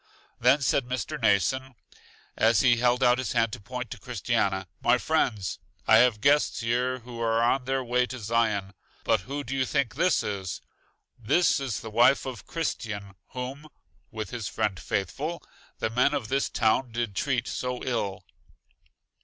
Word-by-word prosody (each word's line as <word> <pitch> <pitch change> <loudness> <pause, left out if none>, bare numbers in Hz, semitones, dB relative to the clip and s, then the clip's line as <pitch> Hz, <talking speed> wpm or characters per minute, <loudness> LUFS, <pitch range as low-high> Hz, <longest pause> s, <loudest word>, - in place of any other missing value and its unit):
Then 125 +5 +4
said 135 -1 +1
Mr. 130 +4 -3
Mnason, 120 +6 +1 0.6
as 110 -1 +4
he 120 -2 +4
held 125 +2 +2
out 125 0 +4
his 130 - -2
hand 115 -2 +1
to - - -5
point 125 +2 -6
to 125 - -7
Christiana: 100 -5 -1
My 120 +1 +4
friends, 120 - 0 0.3
I 110 - +7
have 115 -2 +4
guests 145 +1 +3
here 125 +2 0
who 120 0 -9
are 115 0 +2
on 125 +2 +2
their 135 0 0
way 125 +1 +1
to 130 - -6
Zion. 110 -3 0 0.3
But 110 - +3
who 140 +6 -5
do 130 +1 -4
you 135 - +2
think 140 -1 0
this 170 +5 +2
is? 95 -3 -4 0.6
This 150 +11 +3
is 130 -7 -3
the 110 - -8
wife 120 +5 +4
of 125 -6 -7
Christian 105 -11 -4 0.2
whom 130 +4 -6 0.4
(with 110 -2 -6
his 120 -4 -4
friend 100 -3 -1
Faithful) 145 - -3 0.3
the 110 - -2
men 125 +5 +2
of 125 -6 -3
this 135 +1 +1
town 115 +3 +1
did 115 -3 -3
treat 125 0 0
so 125 -1 -3
ill. 100 -6 -2
120 Hz, 170 wpm, -27 LUFS, 110-130 Hz, 0.6 s, I